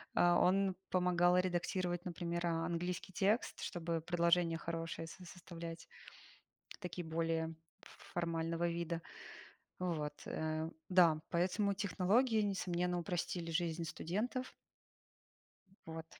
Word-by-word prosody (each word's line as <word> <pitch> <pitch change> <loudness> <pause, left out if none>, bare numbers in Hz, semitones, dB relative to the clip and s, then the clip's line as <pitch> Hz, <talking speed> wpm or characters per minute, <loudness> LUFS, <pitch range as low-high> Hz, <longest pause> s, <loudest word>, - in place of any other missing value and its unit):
А. 175 0 +5
Он 190 +1 +4
помогал 180 -1 +4
редактировать, 180 0 0
например, 170 -1 -2
а 165 -1 +1
английский 175 +2 -2
текст, 205 +6 +1
чтобы 165 -1 -2
предложения 170 0 +3
хорошие 165 0 -4
со 180 +3 -10
составлять, 170 -1 -8 0.9
такие 180 -2 -5
более 165 0 0 0.3
ф - - -13 0.2
формального 170 0 0
вида. 170 0 -2 0.8
Вот, 155 -5 -2
э. 155 0 -2 0.2
Да, 170 -4 +6
поэтому 190 +4 +2
технологии, 210 +4 +3
несомненно, 180 -3 0
упростили 175 0 -2
жизнь 165 0 0
студентов. 215 +11 -2 1.3
Вот. 160 0 -5
175 Hz, 105 wpm, -37 LUFS, 165-180 Hz, 1.3 s, Да